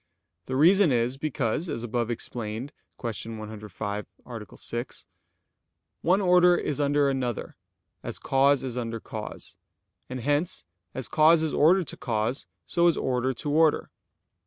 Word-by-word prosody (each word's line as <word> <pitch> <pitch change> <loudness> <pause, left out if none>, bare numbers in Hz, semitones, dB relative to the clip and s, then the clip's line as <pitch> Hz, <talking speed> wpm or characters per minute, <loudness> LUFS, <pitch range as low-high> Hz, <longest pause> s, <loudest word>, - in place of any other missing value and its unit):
The 130 - -2
reason 175 +4 +5
is, 120 +1 +1
because, 145 +2 -1
as 115 -5 -3
above 120 0 -1
explained 120 +3 -4 0.3
(Q. 115 -1 -5
105, 105 -1 -5 0.2
A. 115 -5 -9
6), 120 +2 -5 1.0
one 185 +3 +3
order 180 -2 +5
is 150 - -2
under 145 0 +3
another, 130 -4 -2 0.5
as - - -5
cause 135 0 +3
is 130 -3 -4
under 115 -2 -3
cause; 110 -2 -7 0.5
and 130 0 -5
hence 145 - 0 0.3
as 130 - -2
cause 160 +1 +5
is 160 - -1
ordered 175 +5 +4
to - - -6
cause, 115 +2 -1 0.2
so 170 0 +2
is 170 - +3
order 130 0 0
to 145 +3 -4
order. 155 0 +3
130 Hz, 140 wpm, -27 LUFS, 115-155 Hz, 1.0 s, reason